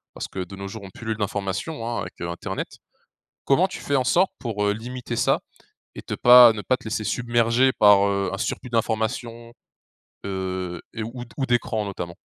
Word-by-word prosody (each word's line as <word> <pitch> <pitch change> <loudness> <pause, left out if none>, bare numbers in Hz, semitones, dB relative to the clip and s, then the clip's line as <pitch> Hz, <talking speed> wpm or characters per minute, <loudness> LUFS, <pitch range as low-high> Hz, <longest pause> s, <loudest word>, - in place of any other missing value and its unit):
Parce - - -5
que, - - -8
de 95 +2 -10
nos 100 0 -6
jours, 105 +2 -8
on 95 - -9
pullule 110 +2 -5
d'informations, 105 - -3
hein, 120 - -2
avec - - -8
internet. 85 +3 -5 0.7
Comment 165 +8 +4
tu - - -7
fais 140 - -1
en 130 - +3
sorte 180 +8 +3
pour, 105 -5 -2
heu, 105 - +2
limiter 120 +2 -6
ça - - +2 0.6
et - - -7
te - - -6
pas 120 -2 +8
ne 105 - -5
pas 125 +7 +1
te - - -19
laisser 110 0 -2
submerger 120 +2 +2
par, 100 -1 +6
heu, 100 -1 0
un - - -3
surplus 125 - -3
d'informations, 115 +1 -2 0.7
heu, 95 -2 -4
et 115 - -4
ou 120 +2 -6
d' 115 - -19
ou 135 - 0
d'écran 110 -3 0
notamment? 90 -3 -6
110 Hz, 195 wpm, -24 LUFS, 100-120 Hz, 0.7 s, pas